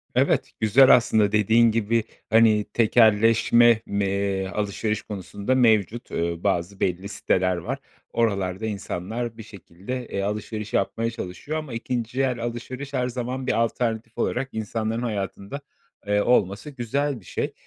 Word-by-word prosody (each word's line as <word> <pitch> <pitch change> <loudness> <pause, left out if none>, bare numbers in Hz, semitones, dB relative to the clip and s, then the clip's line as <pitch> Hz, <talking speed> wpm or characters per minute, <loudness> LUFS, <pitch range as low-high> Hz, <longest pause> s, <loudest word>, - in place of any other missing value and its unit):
Evet, - - +2
güzel 125 +5 +7
aslında 110 -4 +2
dediğin 110 +2 +4
gibi, 115 0 +1 0.3
hani, 110 -1 +5
tekelleşme 115 +1 +4
me 100 0 -1
eee, 100 -1 -1
alışveriş 105 +2 -2
konusunda 100 +4 -3
mevcut, 115 -2 +2
eee, 85 0 -1
bazı 95 0 -1
belli 95 +2 -1
siteler 90 -2 +1
var. 85 - -4 0.3
Oralarda 100 -3 0
insanlar 110 +3 -4
bir 110 - -8
şekilde, 100 +5 -8
eee, 100 - -3
alışveriş 105 +1 -4
yapmaya 115 +4 0
çalışıyor 115 - -5
ama 150 -6 -6
2'nci 120 +2 -2
el 125 -2 0
alışveriş 130 +4 -6
her 125 -1 0
zaman 125 +1 -4
bir - - +2
alternatif 115 -1 -2
olarak 130 +2 -1
insanların 110 +1 -3
hayatında, 105 +3 -4 0.5
eee, 105 0 +2
olması 105 +2 +1
güzel 140 +1 -2
bir 95 - -20
şey. - - -3
110 Hz, 140 wpm, -24 LUFS, 100-120 Hz, 0.5 s, güzel